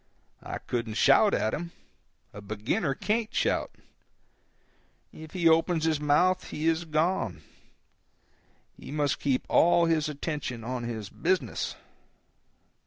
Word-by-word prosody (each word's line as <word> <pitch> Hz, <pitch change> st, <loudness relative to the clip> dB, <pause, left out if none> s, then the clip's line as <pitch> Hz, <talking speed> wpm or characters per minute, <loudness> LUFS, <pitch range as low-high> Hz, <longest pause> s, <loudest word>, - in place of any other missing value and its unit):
I -, -, -5 dB
couldn't 115 Hz, -3 st, -4 dB
shout 140 Hz, -, +5 dB
at 110 Hz, -, 0 dB
him—a 170 Hz, -, -10 dB
beginner 110 Hz, -, -2 dB
can't 215 Hz, -, -1 dB
shout; -, -, 0 dB, 1.4 s
if 155 Hz, 0 st, -11 dB
he 175 Hz, -3 st, +2 dB
opens 165 Hz, 0 st, +3 dB
his 160 Hz, -2 st, +1 dB
mouth 180 Hz, +5 st, +2 dB
he 155 Hz, +2 st, -3 dB
is 165 Hz, +1 st, +1 dB
gone; 155 Hz, -, -1 dB, 1.3 s
he -, -, -12 dB
must 145 Hz, -1 st, 0 dB
keep 135 Hz, -3 st, 0 dB
all 170 Hz, 0 st, +4 dB
his 160 Hz, -2 st, +1 dB
attention 145 Hz, -5 st, -4 dB
on 125 Hz, 0 st, -4 dB
his 110 Hz, -3 st, -5 dB
business. 170 Hz, -, -1 dB
150 Hz, 115 wpm, -28 LUFS, 125-170 Hz, 1.4 s, shout